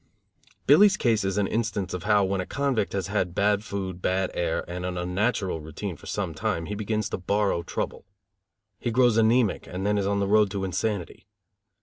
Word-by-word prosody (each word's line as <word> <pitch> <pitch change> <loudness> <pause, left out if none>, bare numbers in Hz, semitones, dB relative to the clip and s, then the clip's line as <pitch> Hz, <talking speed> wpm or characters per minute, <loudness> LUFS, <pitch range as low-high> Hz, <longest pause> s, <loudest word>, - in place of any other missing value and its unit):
Billy's 205 -1 +6
case 115 - +2
is 95 +1 -1
an 105 - +2
instance 105 -3 -2
of 90 0 -5
how, 105 -1 +4
when 95 0 0
a - - -4
convict 135 -7 -1
has 95 -1 -1
had 95 -3 -1
bad 105 0 +2
food, 95 -4 -5
bad 95 0 0
air 85 -2 -1
and 90 +1 -5
an 90 0 -3
unnatural 90 0 -1
routine 80 +5 -6
for - - -14
some - - -2
time, 85 - -2
he 105 - -5
begins 105 +1 -2
to - - -3
borrow 100 -1 +1
trouble. 85 - -5 0.7
He 120 - -2
grows 120 -1 +4
anæmic 115 -1 +2
and 95 +2 -5
then 105 0 +2
is 100 - 0
on 100 0 +1
the 100 - +1
road 105 0 +4
to 100 -1 -3
insanity. 95 0 -3
100 Hz, 200 wpm, -26 LUFS, 95-110 Hz, 0.7 s, Billy's